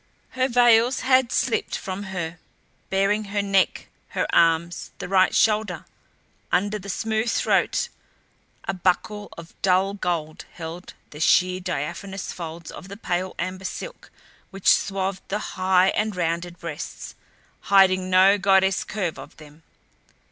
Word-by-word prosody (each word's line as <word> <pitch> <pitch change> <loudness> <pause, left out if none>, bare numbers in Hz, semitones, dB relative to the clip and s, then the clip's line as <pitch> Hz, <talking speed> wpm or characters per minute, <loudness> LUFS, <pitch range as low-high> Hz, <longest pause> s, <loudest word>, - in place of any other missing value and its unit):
Her 260 0 0
veils 240 0 +4
had 255 -1 +3
slipped 235 - 0
from 195 +2 -5
her, 175 -3 -5 0.5
baring 200 +2 +1
her 205 0 -2
neck, 195 -1 +1 0.3
her - - +2
arms, 165 +1 +2
the - - -6
right 190 0 +3
shoulder. 210 -6 +1 0.7
Under 205 +4 +1
the 200 +1 -9
smooth 220 +3 -1
throat - - +1 0.8
a - - 0
buckle 195 +3 -1
of 170 0 -11
dull 190 +1 +2
gold 170 -5 -3
held 170 +1 -8 0.2
the 150 - -10
sheer, 180 +3 +3
diaphanous 180 +3 -4
folds 165 -1 -7
of - - -10
the 200 +1 -9
pale 185 -3 -2
amber 185 +1 -4
silk - - -7 0.4
which 195 -1 +4
swathed 195 -1 -2
the 205 - -1 0.2
high 185 0 +3
and 215 0 -1
rounded 170 0 -2
breasts, 165 -3 -7 0.5
hiding 185 -2 +4
no 190 +2 +5
goddess 190 0 +3
curve 190 -6 -3
of - - -12
them. 150 0 -15
190 Hz, 135 wpm, -24 LUFS, 175-205 Hz, 0.8 s, no